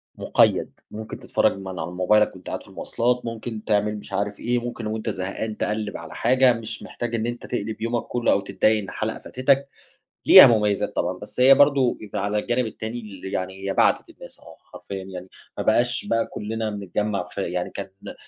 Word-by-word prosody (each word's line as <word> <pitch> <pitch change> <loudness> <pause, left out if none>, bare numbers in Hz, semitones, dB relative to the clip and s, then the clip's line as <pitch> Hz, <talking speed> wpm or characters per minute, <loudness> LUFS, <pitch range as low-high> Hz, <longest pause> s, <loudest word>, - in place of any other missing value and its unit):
مُقيّد. - - +2
مُمكن 110 0 -7
تتفرج - - +1
من 95 -1 -8
على 85 -3 -5
موبايلك 100 +4 +3
وأنت 95 - -13
قاعد - - -4
في - - -18
المواصلات، 125 +1 -1
مُمكن 115 -1 -5
تعمل 105 0 +1
مش 100 - -11
عارف 100 +1 -2
إيه، 120 +1 0
مُمكن 120 -2 -5
وأنت 110 0 -3
زهقان 95 +4 -4
تقلّب 105 -1 -2
على 85 -1 -10
حاجة، 130 +1 +4
مش 115 -1 -7
محتاج 120 -1 -4
إن 115 - -1
أنت 120 0 -4
تقلِب 110 -2 -4
يومك 115 0 -1
كُلّه 120 -1 +1
أو - - +3
تضّايق 110 +2 +2
إن - - -8
حلقة - - -3
فاتتَك، 135 +2 +1 0.6
ليها - - +11
مميزات 105 -3 +1
طبعًا. 90 +1 -1
بس 105 - -9
هي 135 +2 +8
برضه 140 -3 +4
يبقى 105 -2 -4
على 105 +1 -1
الجانب 120 +2 0
التاني 110 +2 -5
ل 100 -4 -11
يعني 95 +1 -4
هي - - 0
بعتت - - +2
الناس - - -13
آه 80 - -15 0.2
حرفيًا 95 -1 -7
يعني، 95 -1 -8 0.3
ما - - -2
بقاش 120 +2 +2
بقى 115 0 +1
كُلّنا 110 +1 -4
بنتجمع 105 0 -2
في 90 +2 -6
يعني 90 0 -2
كانت 100 -1 -7
ن - - -7
110 Hz, 195 wpm, -24 LUFS, 100-120 Hz, 0.6 s, ليها